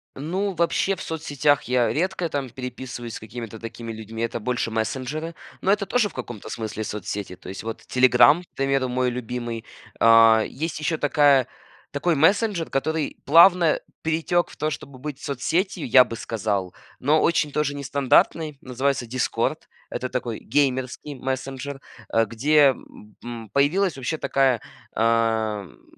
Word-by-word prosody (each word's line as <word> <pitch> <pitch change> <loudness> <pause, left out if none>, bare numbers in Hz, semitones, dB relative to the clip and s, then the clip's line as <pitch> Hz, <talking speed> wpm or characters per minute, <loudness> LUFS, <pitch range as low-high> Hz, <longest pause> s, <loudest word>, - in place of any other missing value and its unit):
Ну, 185 +8 -2
вообще 170 +3 +1
в - - -10
соцсетях 145 -3 0
я 125 -1 +1
редко 180 +1 -1
там 140 -3 -3
переписываюсь 125 -1 -7
с - - -6
какими-то 115 0 -8
такими 115 0 -7
людьми, 110 +1 -6
это 115 0 -2
больше 120 0 -2
мессенджеры. 130 +9 -3 0.3
Но 195 - +2
это 205 0 +1
тоже 215 +1 +1
в - - -17
каком-то 120 -4 -7
смысле 110 -1 -4
соцсети, 105 -2 -5
то - - -15
есть 95 - -7
вот 115 0 -5
"Телеграм", 130 +6 +5
к - - -22
примеру, 135 -1 0
мой 125 0 0
любимый. 120 -1 -5 0.3
А, 115 -1 +7
есть 155 +1 -4
еще 160 +1 -1
такая 145 -3 +4 0.4
такой 155 +4 0
мессенджер, 190 +3 +2
который 155 +2 -1
плавно 170 +1 +6 0.2
перетек 165 +2 +1
в - - -14
то, 155 - 0
чтобы 135 -1 -8
быть 145 0 -6
соцсетью, 160 +6 -1
я 130 +2 +8
бы 115 - -7
сказал, 105 -5 -2 0.3
но 150 +4 +3
очень 160 -3 +2
тоже 145 -1 -1
нестандартный. 140 +2 +1
Называется 130 0 -1
"Дискорд". 125 +2 -2 0.2
Это 130 - -3
такой 120 -3 -3
геймерский 130 +2 -1
мессенджер, 135 +1 -4 0.3
а 115 0 +3
где, 140 +5 +4 0.5
м, 115 -3 -7
появилась 165 +6 +2
вообще 135 +5 -2
такая, 135 -6 +1 0.3
а, 110 -2 +1
м, 90 - -17
130 Hz, 150 wpm, -24 LUFS, 115-155 Hz, 0.5 s, я